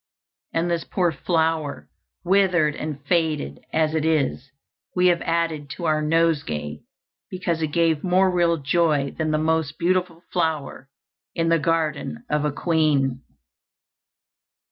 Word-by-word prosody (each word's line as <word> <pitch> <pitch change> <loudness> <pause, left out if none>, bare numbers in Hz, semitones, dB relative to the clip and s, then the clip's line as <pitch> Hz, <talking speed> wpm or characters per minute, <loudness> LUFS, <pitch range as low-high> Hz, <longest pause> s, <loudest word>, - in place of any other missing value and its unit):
And 170 +1 0
this 170 -1 0
poor 180 -3 0
flower, 160 -3 -1 0.4
withered 180 -5 +3
and 150 -2 -5
faded 155 - 0
as 155 -1 +1
it 160 -2 0
is, 145 -4 0 0.5
we 180 0 +4
have 175 -1 +1
added 165 -3 -1
to 175 - -4
our 155 -1 +2
nosegay, 145 - 0 0.5
because 180 -3 -2
it 160 - +1
gave 165 -2 +2
more 185 +1 +3
real 170 -2 +2
joy 145 -2 +1
than 160 -1 -1
the 155 - +1
most 160 -1 0
beautiful 180 -1 0
flower 155 -6 -2 0.5
in 165 0 +1
the 165 0 +3
garden 155 - -1
of 150 0 +1
a 150 - +1
queen." 145 -5 +1
160 Hz, 135 wpm, -23 LUFS, 150-170 Hz, 0.5 s, we